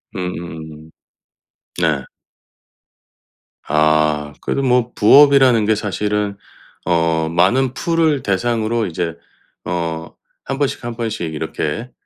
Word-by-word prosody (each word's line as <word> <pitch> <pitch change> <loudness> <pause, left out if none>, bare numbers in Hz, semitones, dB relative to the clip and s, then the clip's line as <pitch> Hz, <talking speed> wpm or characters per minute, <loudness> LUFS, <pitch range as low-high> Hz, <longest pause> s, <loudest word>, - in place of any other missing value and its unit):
음음음. 80 -3 -7 0.9
네. 80 -6 +1 1.6
아 75 -1 +2
그래도 135 - -1
뭐 125 -2 +2
부업이라는 135 -1 +6
게 110 +1 +3
사실은 105 0 -2 0.5
어 80 -2 +1
많은 115 +11 +2
풀을 160 -4 +1
대상으로 115 +2 0
이제 85 -1 -3 0.5
어 80 -2 -4 0.3
1 135 - -3
번씩 140 -2 -2
1 120 -1 -5
번씩 110 -8 -3
이렇게 110 +9 -4
100 Hz, 185 characters per minute, -18 LUFS, 80-120 Hz, 1.6 s, 부업이라는